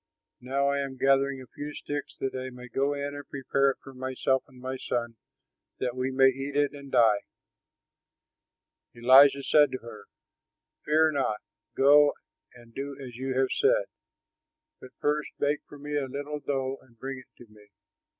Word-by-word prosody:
Now 135 +2 0
I 140 - 0
am 135 -1 -4
gathering 135 +1 +2
a 125 - -19
few 145 0 -6
sticks, 145 +1 -5
that 135 - -2
I 130 0 -4
may 125 0 -11
go 140 +4 0
in 140 0 -4
and 145 -1 -9
prepare 140 0 +1
it 135 - -2
for 135 - -11
myself 130 +1 -1
and 130 -1 -17
my 130 +1 -4
son, 120 -2 -3 0.6
that 125 -1 -2
we 130 +1 -1
may 135 0 +5
eat 135 +2 -5
it 145 -1 +2
and 140 -1 -11
die." 110 -3 +5 1.8
Elijah 135 +4 +6
said 150 0 +5
to - - -1
her, 105 -3 -10 0.8
"Fear 155 +1 +4
not; 135 -7 0 0.4
go 145 +2 +6 0.4
and 120 -1 -17
do 140 +2 -5
as 125 -3 -9
you 130 0 -3
have 130 0 +2
said, - - +3 0.9
but 130 - -12
first 150 0 0
bake 145 +1 0
for 145 - -13
me 145 +1 -5
a 140 -2 -1
little 145 +3 -5
dough 135 -2 -2
and 120 -3 -24
bring 135 +2 -6
it 125 - -17
to 120 - -13
me. 105 -1 -19
135 Hz, 175 wpm, -28 LUFS, 130-145 Hz, 1.8 s, Elijah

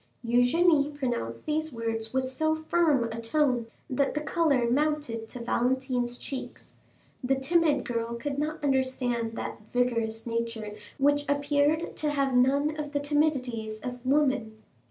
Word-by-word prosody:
Eugénie 285 +5 +3
pronounced 235 - -3
these 310 +1 -1
words 225 -2 -3
with 260 0 0
so 315 +4 0
firm 315 -4 +2
a 230 +1 -5
tone 245 -1 +1 0.2
that 275 +2 0
the - - +1
color 300 -5 +2
mounted 275 -4 0
to 250 - -7
Valentine's 245 0 0
cheeks. 270 0 -7 0.5
The 265 +2 +2
timid 295 0 +2
girl 230 0 -2
could 275 +4 -3
not 305 +1 -3
understand 260 -4 0
that 225 - -5
vigorous 230 -3 0
nature 230 -2 -3 0.2
which 290 +1 +3
appeared 285 +3 +1
to 305 - 0
have 275 -2 +1
none 280 +5 +3
of 295 -1 -4
the 285 - +1
timidities 265 -7 0
of 245 -1 -6
woman. 260 -6 +1
265 Hz, 140 wpm, -28 LUFS, 235-295 Hz, 0.5 s, Eugénie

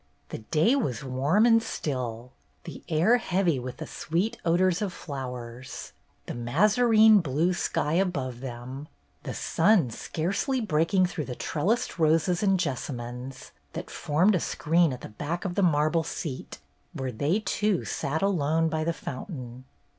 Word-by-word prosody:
The - - -5
day 160 - +2
was 135 - -1
warm 140 - +2
and 230 -1 +5
still, 125 - -4 0.3
the - - -9
air 175 +10 +4
heavy 180 - +1
with 125 0 -6
the 155 - -6
sweet 180 +11 -2
odors 175 +2 +2
of 205 -3 -1
flowers; 125 -4 -7 0.3
the - - -5
mazarine 215 - +5
blue 165 +3 +1
sky 155 -3 -1
above 145 -10 0
them, 130 +3 -7 0.3
the - - -6
sun 170 - +3
scarcely 195 - -2
breaking 185 -2 +2
through 170 -4 -3
the 125 - -5
trellised 180 - -1
roses 165 +3 +3
and 195 -3 +3
jessamines 130 -4 -5 0.2
that - - -6
formed 175 +8 +2
a 180 - +2
screen 165 +1 +2
at 125 - -6
the - - -8
back 150 - -4
of 185 - -2
the 200 - 0
marble 155 -1 +3
seat 155 -4 -6 0.4
where 130 -1 -3
they 145 - 0
two 210 -3 0
sat 155 +6 -2
alone 165 -4 +2
by 155 0 -1
the 165 +1 0
fountain. 130 - -7
160 Hz, 150 wpm, -27 LUFS, 130-185 Hz, 0.4 s, and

